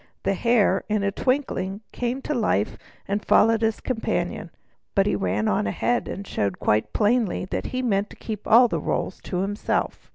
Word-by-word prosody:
The 195 - +1
Hare 205 -2 +2
in 210 -1 +1
a 200 - +1
twinkling 210 -6 -1
came 245 +2 -3
to 300 - -2
life, 210 - +1 0.3
and 205 +1 -1
followed 225 +1 +4
his 225 -1 +1
companion. 245 -4 -2 0.5
But 195 -1 +4
he - - +1
ran 100 +2 0
on 100 - +1
ahead, 240 - 0
and 200 - -5
showed 100 - -2
quite 105 +1 +1
plainly 215 -3 +1
that - - -2
he 255 0 -3
meant 205 -3 +1
to - - -12
keep 215 -3 -6
the 235 +1 +5
rolls - - -2
all - - -10
to 180 - -2
himself. 205 +2 -2
210 Hz, 185 wpm, -24 LUFS, 190-235 Hz, 0.5 s, the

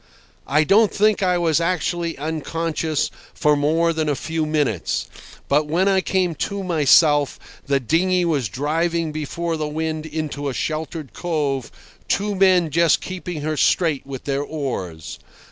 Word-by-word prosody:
I 150 +3 +3
don't 205 +6 +4
think 210 0 +2
I 180 -2 +2
was 170 -2 +2
actually 170 -1 -1
unconscious 160 +1 -2 0.2
for 150 0 +3
more 160 +4 +2
than 155 -1 -1
a 145 - +1
few 160 +2 -2
minutes, 145 - 0 0.4
but 150 +2 +2
when 175 +5 +1
I 190 -1 +3
came 185 -2 0 0.2
to 200 -1 -4
myself 150 -3 +4 0.3
the 140 0 +2
dinghy 175 +7 +1
was 145 - 0
driving 165 - -1
before 160 +2 -3
the 155 -1 -2
wind 155 +1 -3
into 150 -2 -3
a 130 - -5
sheltered 155 -1 -4
cove, 145 -7 -2 0.4
two 205 +1 0
men 185 -4 +3
just 170 +1 +4
keeping 180 -4 -6
her 155 +1 -2
straight 155 -1 +2
with 135 -2 -7
their 140 0 -1
oars. 125 - -5
160 Hz, 150 wpm, -21 LUFS, 145-170 Hz, 0.4 s, don't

